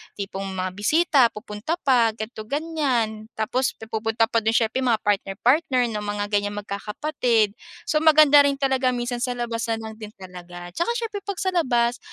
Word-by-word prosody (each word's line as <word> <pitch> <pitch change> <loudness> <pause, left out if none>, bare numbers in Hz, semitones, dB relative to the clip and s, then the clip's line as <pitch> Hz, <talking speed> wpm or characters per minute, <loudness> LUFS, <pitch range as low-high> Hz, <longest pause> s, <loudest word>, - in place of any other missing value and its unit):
tipong 195 -1 -5
mga 185 0 -2
bisita 270 - +3
pupunta 210 +7 -4
pa 235 -5 +3
ganito, 220 -1 -7
ganyan. 260 -8 -1
Tapos 250 +4 -1 0.2
pupunta 225 +1 0
pa 230 - +3
do'n 225 +1 0
siyempre 225 +2 +1
mga 240 -4 +1
partner-partner 245 +6 +1
ng 210 - -3
mga 205 0 -3
ganyang 205 0 0
magkakapatid. 220 +2 0 0.3
So 305 - +1
maganda 305 -2 +7
rin 280 - 0
talaga 265 -2 +1
minsan 240 0 -3
sa 250 0 -2
labas 235 -1 -3
na 225 - 0
lang 220 0 -8
din 215 0 -9
talaga 175 -2 -10
at - - -8
saka 470 +8 0
siyempre 450 -4 -3
'pag 400 - -2
sa 375 - 0
labas, 245 -8 +1
230 Hz, 175 wpm, -23 LUFS, 210-270 Hz, 0.3 s, maganda